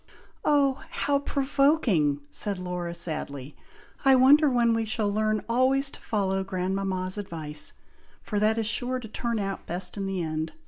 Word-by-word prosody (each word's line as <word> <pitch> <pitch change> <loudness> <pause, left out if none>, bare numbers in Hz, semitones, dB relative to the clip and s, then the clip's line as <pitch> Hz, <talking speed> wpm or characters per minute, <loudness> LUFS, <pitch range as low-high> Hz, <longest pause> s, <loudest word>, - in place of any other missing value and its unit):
"Oh! 280 -2 +2
how 280 0 0
provoking!" 275 - +1
said 200 +5 -1
Laura, 180 -1 -4
sadly, 150 -5 -1 0.5
"I 270 -1 +6
wonder 285 +4 +6
when 240 -2 +3
we 225 0 0
shall 215 -2 -1
learn 215 0 0
always 265 +3 +3
to - - -11
follow 195 -3 -1
grandmama's 190 0 -2
advice, 155 -6 -4 0.5
for 210 - -2
that 215 +2 +2
is 225 - 0
sure 250 +3 -1
to 235 - -9
turn 235 +1 -3
out 195 -2 -4
best 180 +3 -3
in 195 -1 -2
the 190 -2 -2
end. 155 0 -3
210 Hz, 155 wpm, -26 LUFS, 180-255 Hz, 0.5 s, I